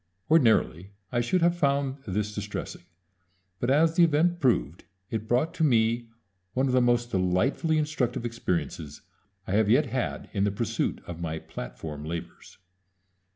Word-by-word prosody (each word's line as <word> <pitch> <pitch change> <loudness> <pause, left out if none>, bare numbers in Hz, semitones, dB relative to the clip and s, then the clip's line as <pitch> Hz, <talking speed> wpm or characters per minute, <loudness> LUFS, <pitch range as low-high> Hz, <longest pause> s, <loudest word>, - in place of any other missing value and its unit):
Ordinarily 110 - +3 0.2
I 120 - +1
should 170 +9 +1
have 170 0 +4
found 140 -3 +1
this 105 +2 -2
distressing; 105 -3 -6 0.7
but, 120 - -1
as 160 +4 +4
the 175 - +6
event 170 +2 +3
proved, 90 - +1 0.3
it 110 -1 -3
brought 130 +8 +1
to 175 - -1
me 115 -3 +2 0.5
one 130 +1 +2
of 130 - 0
the 130 - +4
most 120 0 +2
delightfully 105 - +1
instructive 150 -6 -1
experiences 85 - -3 0.4
I - - -5
have 105 +1 +3
yet 135 +7 +5
had 130 0 -3
in 100 -2 +1
the 105 - +3
pursuit 100 - -2
of 85 -1 -7
my 80 -1 -3
platform 75 +1 -7
labors. 85 +2 -7
120 Hz, 155 wpm, -27 LUFS, 95-140 Hz, 0.7 s, the